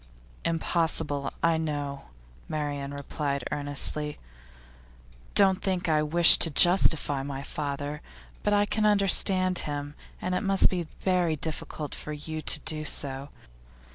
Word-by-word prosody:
'Impossible; 160 -4 -1
I 165 -1 +3
know,' 145 -3 -4 0.4
Marian 145 -2 -3
replied 140 -1 -4
earnestly. 150 +1 0 1.2
'Don't 190 -2 +4
think 185 -2 -1
that 160 - +1
I 150 - +2
wish 165 +3 +6
to 165 - +4
justify 160 -4 +4
my 135 0 -6
father. 145 +1 -5 0.4
But 205 - 0
I 205 0 +3
can 215 +1 0
understand 190 -2 +3
him, 145 0 -5 0.3
and 180 - -3
it 180 - 0
must 195 -2 +3
be 175 -3 -3
very 180 -4 +1
difficult 155 -1 -5
for 150 - -7
you 155 +1 -6
to 150 - 0
do 155 -1 -3
so. 140 -2 -3
155 Hz, 135 wpm, -27 LUFS, 145-180 Hz, 1.2 s, wish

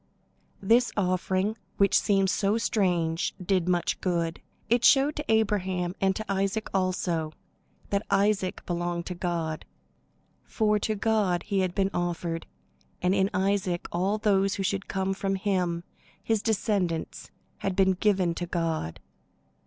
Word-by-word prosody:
This 235 +5 +4
offering, 185 +2 0 0.2
which 200 0 +3
seems 195 -2 +3
so 200 +2 +1
strange, 180 -6 0
did 185 -1 0
much 175 -1 0
good. 170 -3 -1 0.3
It 240 +2 +2
showed 280 +2 +5
to 300 -5 -2
Abraham, 190 -5 +1
and 190 -1 +2
to 215 - -4
Isaac 195 +2 -1
also, 180 -4 0 0.6
that 200 +1 +1
Isaac 195 -1 +1
belonged 175 -1 -2
to 180 - -4
God, 170 -3 -3 0.8
for 210 -2 +1
to 215 +1 -1
God 205 -4 +1
he 200 -2 -1
had 185 -2 0
been 195 -1 +1
offered; 170 -1 -2 0.5
and 180 +1 +2
in 195 0 +2
Isaac 185 -2 0
all 190 +5 0
those 195 -2 +2
who 195 - -2
should 195 0 -1
come 190 0 -1
from 195 0 -1
him, 180 -4 -1 0.4
his 220 -1 +1
descendants, 200 -7 -1 0.3
had 195 -1 -2
been 190 0 +4
given 185 -2 +1
to 175 +1 -4
God. 165 - -2
190 Hz, 140 wpm, -27 LUFS, 175-205 Hz, 0.8 s, showed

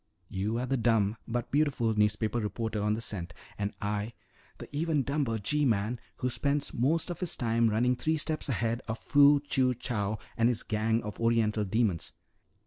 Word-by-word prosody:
You 100 +4 -2
are 125 - -1
the 135 +1 0
dumb 115 -3 +2
but 120 0 -3
beautiful 140 -6 +2
newspaper 105 +2 +1
reporter 110 0 -2
on 105 +1 +1
the 115 - -4
scent, 90 -6 -3 0.2
and 100 0 -2
I 105 +2 -2 0.2
" - - -30
"The - - -9
even 155 -2 +1
dumber 140 -5 0
G 150 +9 0
man 115 -1 +1 0.2
who 125 - -1
spends 140 +2 -1
most 155 +8 +1
of 175 - -6
his 180 -3 0
time 115 -1 +2
running 120 +4 +2
three 160 +6 0
steps 155 -1 -2
ahead 115 0 0
of 110 0 -2
Fu 145 +2 +5
Chew 130 -3 +1
Chow 110 -3 -2 0.2
and 115 +1 +3
his 120 -2 -1
gang 110 +1 0
of 105 -2 -7
oriental 115 -2 +2
demons. 100 -4 0
115 Hz, 185 wpm, -30 LUFS, 105-135 Hz, 0.2 s, Fu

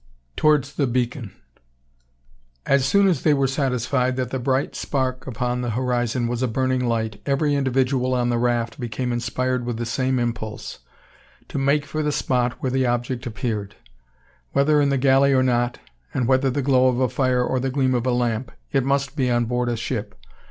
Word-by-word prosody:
TOWARDS 150 -3 +2
THE 140 -1 0
BEACON! 120 -2 -2 1.3
As 135 -1 +3
soon 200 +6 +4
as 170 -8 +1
they 150 -2 +3
were 135 -1 +2
satisfied 130 -1 0
that 130 -1 -3
the 130 - -2
bright 130 +2 0
spark 130 -2 -2
upon 125 0 -2
the 120 - -2
horizon 125 -1 0
was 120 0 -2
a 130 - +2
burning 130 +2 0
light, 110 -3 -2
every 145 +1 +1
individual 130 -1 +1
on 120 -1 +1
the 120 -1 +1
raft 120 -1 0
became 120 +1 -3
inspired 125 +1 -1
with 120 -1 -3
the 120 - -3
same 130 +2 0
impulse, 115 -3 -4 0.7
to - - -3
make 140 +2 +2
for 155 - -3
the 150 0 0
spot 125 -3 0
where 130 - -1
the 130 0 +1
object 120 +1 -2
appeared. 110 -3 -4 0.8
Whether 150 +2 +3
in 140 - +2
the 140 - +1
galley 135 +1 +4
or 130 -1 +4
not, 120 -1 +1 0.4
and 125 -3 +1
whether 130 +1 +3
the 140 +2 -1
glow 130 -1 +4
of 125 -1 +1
a 130 - +3
fire 125 0 +1
or 130 +1 0
the 135 +1 -1
gleam 130 -1 +1
of 125 0 0
a - - +3
lamp, 120 -1 -1 0.2
it 135 -2 +2
must 140 +1 0
be 130 -4 +1
on 120 -1 +2
board 125 +1 -1
a 120 - -1
ship. 110 -2 -4
130 Hz, 195 wpm, -23 LUFS, 120-135 Hz, 1.3 s, soon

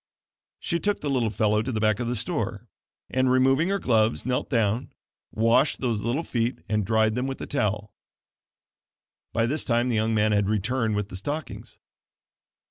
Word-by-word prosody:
She 170 -2 -1
took 205 +2 -1
the 145 - -2
little 120 -4 +1
fellow 105 0 +1
to 130 - -3
the 110 - -2
back 110 -1 +2
part 120 - -3
of - - -3
the 120 - -1
store, 120 - -3 0.4
and, 130 0 +1
removing 135 +6 +3
her 200 - +1
gloves 115 - +1
knelt 125 0 -1
down, 115 -2 0 0.4
washed 115 +6 +2
those 115 -5 -1
little 120 +9 -1
feet 120 -2 -1
and 105 0 0
dried 110 +1 +2
them 125 +3 -1
with 135 - -4
the - - -6
towel. 105 -6 -2 1.4
By 115 - +1
this 145 +6 0
time 120 0 +1
the 120 - 0
young 110 +1 +1
man 110 0 +2
had 105 -1 +2
returned 110 +2 0
with 105 -1 -2
the 95 - -6
stockings. 145 +10 -5
115 Hz, 185 wpm, -25 LUFS, 110-130 Hz, 1.4 s, removing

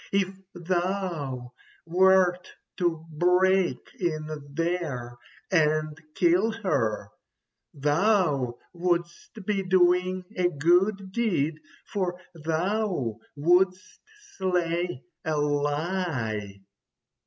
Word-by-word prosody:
If 195 -1 +1 0.2
thou 175 -8 -2 0.3
wert 180 +1 +3 0.3
to 170 -3 0
break 180 -1 +3 0.2
in 155 -4 -3
there 150 -7 -2 0.4
and 155 -3 +2 0.2
kill 180 +5 +3
her, 125 - 0 0.6
thou 145 - +2 0.2
wouldst 175 +4 -2
be 205 -1 +1
doing 185 0 +2
a 180 -1 +2
good 185 +6 +2
deed, 170 -9 0 0.3
for 180 -3 -2
thou 165 - -1 0.2
wouldst 185 +4 +2 0.4
slay 175 -5 0 0.2
a 155 -1 -1
lie." 145 - -1
175 Hz, 80 wpm, -27 LUFS, 150-185 Hz, 0.6 s, wert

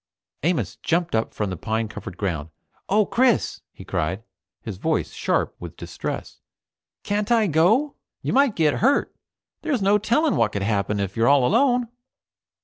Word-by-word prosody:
Amos 170 +2 -1
jumped 170 +1 0
up 110 0 0
from 105 -3 -3
the - - -3
pine 110 +5 -2
covered 105 -3 -8
ground. 80 -6 -3 0.4
"Oh, 210 +1 +4
Chris!" 250 +2 +1
he - - -13
cried, 95 +7 -2 0.4
his 100 -5 -7
voice - - -1
sharp - - 0
with - - -9
distress, - - -6 0.6
"can't 205 +2 -1
I 230 -2 +4
go? 205 - +3 0.3
You - - -1
might 275 -4 +4
get 155 -3 +2
hurt. 275 +6 +2 0.5
There's 280 -10 -1
no 205 +2 +4
telling 275 +9 +2
what 110 -2 +2
could 100 - -2
happen 100 0 0
if 100 -1 -3
you're 115 0 +2
all 140 -3 +5
alone!" 245 - +3
165 Hz, 160 wpm, -23 LUFS, -, 0.6 s, all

